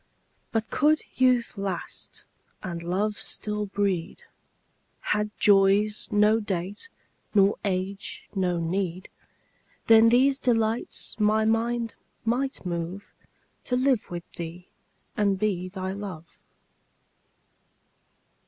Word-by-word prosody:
But 225 -1 -2
could 305 +1 +3
youth 250 -4 +2
last 195 -2 -5 0.4
and 170 -2 -4
love 200 +5 -1
still 210 -1 -1
breed, 195 -3 -2 0.9
Had 210 0 0
joys 205 +1 +4
no 210 +1 +4
date 200 - -3 0.5
nor 200 0 +5
age 195 0 -3
no 180 -3 0
need, 180 +1 -2 0.8
Then 225 0 +7
these 265 +3 +4
delights 225 -2 0
my 215 +1 +3
mind 230 +1 0 0.3
might 255 0 -1
move 175 +3 -4 0.5
To 250 - 0
live 255 -2 +2
with 175 -1 -6
thee 170 +1 -8 0.5
and 200 -2 +2
be 185 -3 -1
thy 190 0 -4
love. 190 -5 -8
205 Hz, 100 wpm, -26 LUFS, 185-225 Hz, 0.9 s, Then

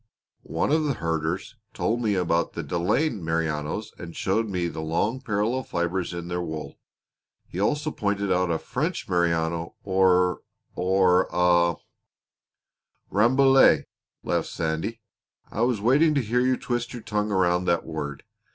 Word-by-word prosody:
"One - - 0
of 155 0 +2
the 140 -3 0
herders 85 +6 -2 0.2
told 120 +2 0
me 105 -3 +1
about 85 -2 0
the 85 - -4
Delaine 90 - 0
Merinos 80 +3 -2
and 85 -1 -8
showed 110 +3 0
me 90 -3 -1
the 80 -1 -5
long 85 +11 -1
parallel 115 +1 0
fibers 85 -4 -2
in 85 -1 -6
their 90 0 -2
wool; 80 -2 -6 0.7
he 90 - -6
also 150 +9 0
pointed 100 -4 -1
out 90 0 +1
a 85 - +1
French 150 - -3
Merino, 85 -2 0
or 90 -2 +3 0.3
or 95 0 +3
a 85 -1 +3 0.6
" - - -49
"Rambouillet!" 130 - +5 0.4
laughed - - 0
Sandy. 80 +8 -3 0.5
"I 110 - -3
was 120 -2 +2
waiting 145 +7 +4
to 140 - +2
hear 120 +3 +1
you 130 0 +2
twist 120 0 -3
your 120 -3 -7
tongue 105 0 -1
around 90 -2 +2
that 85 - +1
word. 75 -3 -5
95 Hz, 150 wpm, -25 LUFS, 85-115 Hz, 0.7 s, Rambouillet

